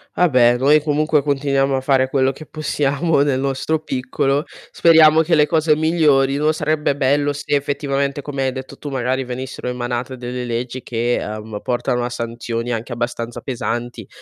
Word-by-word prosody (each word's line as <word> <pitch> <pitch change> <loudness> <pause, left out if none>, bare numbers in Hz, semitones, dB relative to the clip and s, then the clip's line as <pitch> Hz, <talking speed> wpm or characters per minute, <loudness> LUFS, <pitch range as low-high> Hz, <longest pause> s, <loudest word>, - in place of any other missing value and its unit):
Vabbè, 125 -8 +4
noi 145 +4 +4
comunque 150 0 +1
continuiamo 140 -1 +1
a 130 - -1
fare 130 -1 +2
quello 135 -1 +2
che 155 +4 -11
possiamo 150 +1 0
nel 140 -2 +1
nostro 140 +3 -1
piccolo, 135 0 -1 0.3
speriamo 160 -1 +6
che 165 +1 +2
le 150 -1 +5
cose 155 -1 +2
migliorino. 150 -2 +2
Sarebbe 150 -2 0
bello 145 +1 +1
se, 145 +1 -4
effettivamente, 140 0 -1
come 140 -2 -4
hai 130 - 0
detto 130 0 -8
tu, 145 - -7
magari 130 0 -1
venissero 125 +1 -6
emanate 125 +1 -3
delle 125 0 -5
leggi, 120 +2 -4
che, 120 +1 -1
uhm, 105 0 -6
portano 120 0 -1
a - - -3
sanzioni 115 0 -4
anche 115 +1 -4
abbastanza 120 0 -4
pesanti, 120 -1 -4
135 Hz, 160 wpm, -19 LUFS, 125-150 Hz, 0.3 s, speriamo